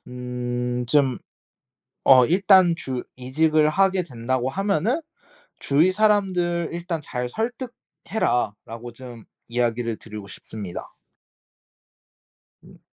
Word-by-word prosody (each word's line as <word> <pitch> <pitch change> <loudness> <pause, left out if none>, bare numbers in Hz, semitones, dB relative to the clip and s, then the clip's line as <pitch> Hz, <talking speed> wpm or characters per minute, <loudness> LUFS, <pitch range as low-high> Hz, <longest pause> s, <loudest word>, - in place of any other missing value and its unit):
음 125 0 -3
좀 135 -1 +2 0.9
어 130 -2 +7
일단 185 - +5
주 130 -5 -4
이직을 155 +4 +2
하게 190 +2 +2
된다고 130 -3 -2
하면은 200 - 0 0.6
"주위 155 +6 +3
사람들 185 -5 +1
일단 170 -1 -4
잘 125 -3 -4
설득해라."라고 160 - -3
좀 120 -2 -11 0.2
이야기를 120 -1 -1
드리고 105 -2 -9
싶습니다. 100 -1 -8 1.7
음. - - -16
135 Hz, 205 characters per minute, -23 LUFS, 120-180 Hz, 1.7 s, 어